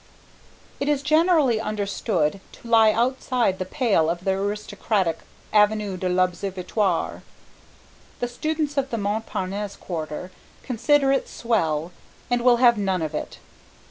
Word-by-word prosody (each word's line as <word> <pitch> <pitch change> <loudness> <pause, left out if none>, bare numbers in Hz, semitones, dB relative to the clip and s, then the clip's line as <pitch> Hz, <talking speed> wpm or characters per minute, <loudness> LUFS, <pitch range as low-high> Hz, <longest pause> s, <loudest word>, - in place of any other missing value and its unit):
It 280 - -1
is 285 -2 +1
generally 305 -6 +3
understood 200 -5 -1
to - - -13
lie 225 -2 +6
outside 240 -3 0
the 185 - -2
pale 200 - +2
of 175 +1 -3
the 190 - +1
aristocratic 200 -2 -1 0.3
Avenue 210 -2 +3
de 185 0 -2
l'Observatoire. 185 +1 -1 1.0
The 245 - -1
students 300 +3 -2
of 270 -1 0
the 235 - -2
Montparnasse 205 -1 -3
Quarter 165 +1 -6 0.3
consider 270 +3 +2
it 275 - 0
swell 170 -8 -1 0.4
and 245 0 +2
will 245 0 +5
have 235 -2 +5
none 190 -4 0
of 155 - -4
it. - - -5
210 Hz, 130 wpm, -24 LUFS, 185-245 Hz, 1.0 s, lie